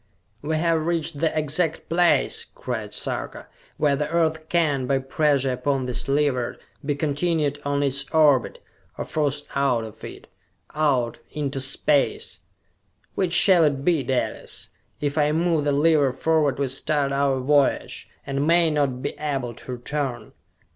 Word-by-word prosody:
"We 155 +1 -1
have 165 -1 +1
reached 165 -3 -1
the 160 0 0
exact 155 +2 -1
place," 175 +1 +2
cried - - -5
Sarka, - - -4 0.3
"where 145 -2 +2
the 150 +2 -2
Earth 160 -1 0
can, 145 -7 +1
by 135 0 +2
pressure 135 0 +1
upon 130 +1 -1
this 125 +1 -3
lever, 135 -4 0 0.3
be 145 0 -1
continued 145 0 0
on 145 0 0
in 140 - +2
its 140 +1 -3
orbit 150 -6 +3 0.4
or - - -4
forced 145 -1 -1
out 135 -4 +1
of 110 -2 -11
it - - -9 0.5
out 140 -6 +1
into 140 -2 -2
space! 135 +2 +1 0.7
Which 180 -3 -1
shall 175 -1 +6
it 140 -2 0
be, 170 -5 +3
Dalis? 130 -1 -3 0.3
If 145 +1 -1
I 150 0 +3
move 165 -2 +1
the 145 - +2
lever 145 -1 +3
forward 150 +1 +1
we 140 -1 0
start 140 +1 0
our 140 -1 +1
voyage, 140 +1 +1 0.2
and 140 +2 -1
may 170 -1 +4
not 140 -4 0
be - - -2
able 135 -5 -2
to 125 - -10
return!" 125 -2 -4
145 Hz, 155 wpm, -24 LUFS, 135-155 Hz, 0.7 s, shall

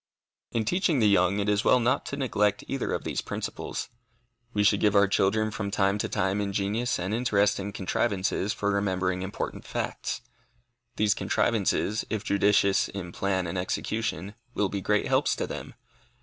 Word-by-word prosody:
In 115 -2 0
teaching 175 - +2
the 110 -4 +4
young, 95 -1 +3
it 100 0 -1
is 105 0 +2
well 125 - +5
not 120 +2 +1
to 140 - -4
neglect 105 -6 +1
either 135 - -2
of - - -2
these - - -2
principles. - - -4 0.6
We 105 -2 +1
should 105 -1 +4
give 105 -1 +3
our 100 0 +6
children 110 +3 +2
from 100 -1 -3
time 100 0 +1
to - - -1
time 95 0 0
ingenious 100 +4 -1
and 90 +3 -3
interesting 105 -4 +1
contrivances 100 0 0
for 100 -1 -1
remembering 95 -2 0
important 95 +2 -4
facts. - - -3 0.7
These 105 -1 +3
contrivances, 105 -1 +1
if 110 -3 -2
judicious 100 -1 +3
in 90 -3 -6
plan 95 0 -1
and 85 +2 -3
execution, 100 0 -2 0.2
will 105 -2 +1
be 100 0 -3
great 105 +2 +1
helps - - +2
to - - -2
them. - - -7
100 Hz, 165 wpm, -27 LUFS, 95-110 Hz, 0.7 s, our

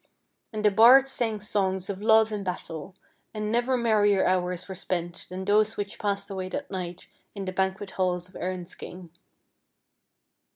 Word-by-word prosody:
And 215 -1 -3
the 210 - +6
bards 255 +6 +7
sang 225 -5 -1
songs 190 -3 0
of 200 -1 -5
love 220 0 +5
and 210 -2 -3
battle, 175 -1 -6 0.4
and 215 0 -2
never 245 +2 +1
merrier 210 -4 +3
hours 180 -1 0
were 190 - -6
spent 175 -1 -4
than 185 +1 -5
those 215 +2 +3
which 205 +1 -4
passed 200 -1 -1
away 185 -1 -4
that 185 - -5
night 180 -2 -5 0.3
in 200 -1 -5
the 185 - -3
banquet 190 +1 -2
hall 185 -1 +1
of 180 +1 -10
Erin's 180 -1 -4
king. 180 -2 -10
195 Hz, 165 wpm, -27 LUFS, 185-215 Hz, 0.4 s, bards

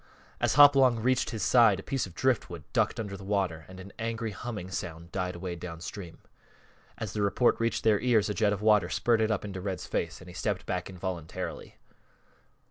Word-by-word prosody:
As - - +1
Hopalong 135 -4 +7
reached 125 +2 +1
his 110 - -3
side 115 -6 +5
a - - -8
piece 135 -6 -2
of 90 - -15
driftwood 110 - 0
ducked - - +1
under 100 -3 -4
the 100 - -10
water 95 -6 -1
and 95 0 -11
an 95 +2 -11
angry 115 0 -3
humming 105 -2 -6
sound 85 -1 -6
died 90 -2 -2
away 90 0 -5
downstream. 85 +1 -8 0.8
As 110 -4 -5
the 105 - -2
report 100 +4 +2
reached 115 0 0
their 105 -2 +4
ears 120 -4 +3
a 105 - -1
jet 105 -1 +2
of 105 0 -3
water 105 -5 +4
spurted 110 0 +2
up 105 -2 -1
into 95 -2 -6
Red's 95 -3 -4
face 80 -2 -3
and 90 - -13
he 90 - -10
stepped 90 - -2
back 90 0 -3
involuntarily. 90 -3 -6
100 Hz, 195 wpm, -29 LUFS, 90-115 Hz, 0.8 s, Hopalong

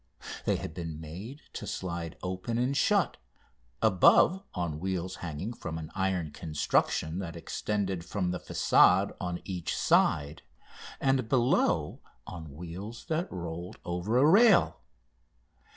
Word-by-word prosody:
They - - +2
had - - -5
been 80 -3 -6
made 95 - -8
to - - -6
slide 85 -3 -4
open 95 +5 -3
and 125 +3 +1
shut, - - +2 0.7
above 110 - +5
on 85 -4 -2
wheels 95 0 -3
hanging 90 +7 -5
from 80 -8 -6
an 80 -1 -7
iron 95 -5 -1
construction 80 +2 0
that 85 -4 -5
extended 95 +1 -2
from 90 -1 -2
the 90 - -3
façade - - +4
on 90 -1 -4
each 90 -4 -3
side, 70 +2 +2 0.6
and 135 -4 +1
below 125 -2 +2 0.2
on 80 -5 -8
wheels 90 +8 -8
that 165 +2 -1
rolled 85 -1 -6
over 90 +7 -1
a 135 - +5
rail. 200 +4 +5
90 Hz, 130 wpm, -29 LUFS, 85-110 Hz, 0.7 s, above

